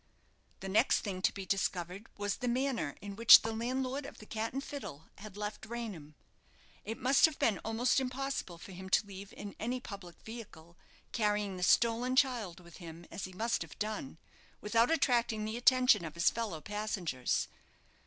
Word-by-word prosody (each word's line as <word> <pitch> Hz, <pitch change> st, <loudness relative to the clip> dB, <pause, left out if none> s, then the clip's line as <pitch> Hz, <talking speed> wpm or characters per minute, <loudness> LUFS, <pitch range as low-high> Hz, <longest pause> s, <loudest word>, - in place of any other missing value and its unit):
The 195 Hz, -, -5 dB
next 195 Hz, +3 st, +3 dB
thing 190 Hz, -3 st, -4 dB
to -, -, +3 dB
be 195 Hz, -1 st, -7 dB
discovered 185 Hz, +2 st, -2 dB
was 205 Hz, -1 st, -1 dB
the 250 Hz, -, -3 dB
manner 240 Hz, -, 0 dB
in 200 Hz, -1 st, -7 dB
which 230 Hz, +2 st, +9 dB
the 225 Hz, 0 st, -2 dB
landlord 260 Hz, +4 st, -2 dB
of -, -, -11 dB
the 215 Hz, -, -12 dB
"Cat 220 Hz, +1 st, -3 dB
and 270 Hz, +2 st, -3 dB
Fiddle" 160 Hz, -, -8 dB
had 205 Hz, -1 st, -10 dB
left 210 Hz, +1 st, -5 dB
Raynham. 205 Hz, -11 st, -6 dB, 0.7 s
It 225 Hz, +2 st, -5 dB
must 265 Hz, +2 st, +5 dB
have 315 Hz, -3 st, 0 dB
been 210 Hz, -4 st, +2 dB
almost 235 Hz, +4 st, +1 dB
impossible 260 Hz, -8 st, -3 dB
for 185 Hz, -, -11 dB
him 190 Hz, +1 st, -8 dB
to 205 Hz, -, +3 dB
leave 200 Hz, 0 st, -9 dB
in 205 Hz, -1 st, -8 dB
any 245 Hz, +3 st, -2 dB
public 195 Hz, -7 st, -9 dB
vehicle, 180 Hz, -8 st, -10 dB, 0.4 s
carrying 210 Hz, -3 st, 0 dB
the 180 Hz, -, -7 dB
stolen 235 Hz, +6 st, +3 dB
child 240 Hz, -10 st, +1 dB
with 170 Hz, -2 st, -14 dB
him, 170 Hz, -1 st, -10 dB
as 190 Hz, -, -5 dB
he 185 Hz, -, -9 dB
must 225 Hz, +5 st, -1 dB
have -, -, -7 dB
done, 210 Hz, -9 st, -4 dB, 0.4 s
without 230 Hz, +3 st, +2 dB
attracting 240 Hz, -8 st, +2 dB
the 220 Hz, +1 st, -3 dB
attention 250 Hz, -3 st, +5 dB
of 160 Hz, -1 st, -6 dB
his 170 Hz, -, +3 dB
fellow 215 Hz, -9 st, -4 dB
passengers. 200 Hz, -, -1 dB
215 Hz, 180 wpm, -33 LUFS, 185-240 Hz, 0.7 s, which